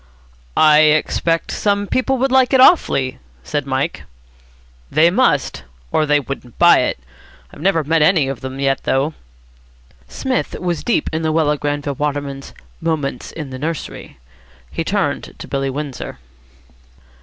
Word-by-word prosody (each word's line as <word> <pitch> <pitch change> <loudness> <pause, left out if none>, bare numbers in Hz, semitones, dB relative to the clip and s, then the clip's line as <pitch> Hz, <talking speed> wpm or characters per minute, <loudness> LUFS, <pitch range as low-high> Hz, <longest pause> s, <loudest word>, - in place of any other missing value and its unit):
"I 150 -1 +6
expect 155 +2 +2
some 205 -1 0
people 255 +5 0
would 265 +1 0
like 260 0 +4
it 265 - +5
awfully," 140 - +4 0.2
said 145 - -3
Mike. 130 +1 -1 0.9
"They 160 +4 +4
must, 175 - +1 0.3
or 155 - +1
they 145 0 +4
wouldn't 135 -3 -8
buy - - +6
it. - - 0 0.6
I've - - -12
never 165 -3 +2
met 160 +2 +1
any 155 -3 +4
of 135 -1 -5
them 130 0 -6
yet, 135 -1 +1
though." 140 +4 0 0.9
Psmith 260 -1 -3
was 175 -2 -2
deep 240 - 0
in 160 - -1
Luella 155 -1 +1
Granville 145 0 -2
Waterman's 140 -1 -4 0.3
"Moments 150 -6 -2
in 150 -5 -7
the 130 - -7
Nursery." 160 +2 -5 0.5
He - - -2
turned - - -2
to - - -9
Billy 135 0 -2
Windsor. 140 - -5
150 Hz, 145 wpm, -18 LUFS, 135-165 Hz, 0.9 s, I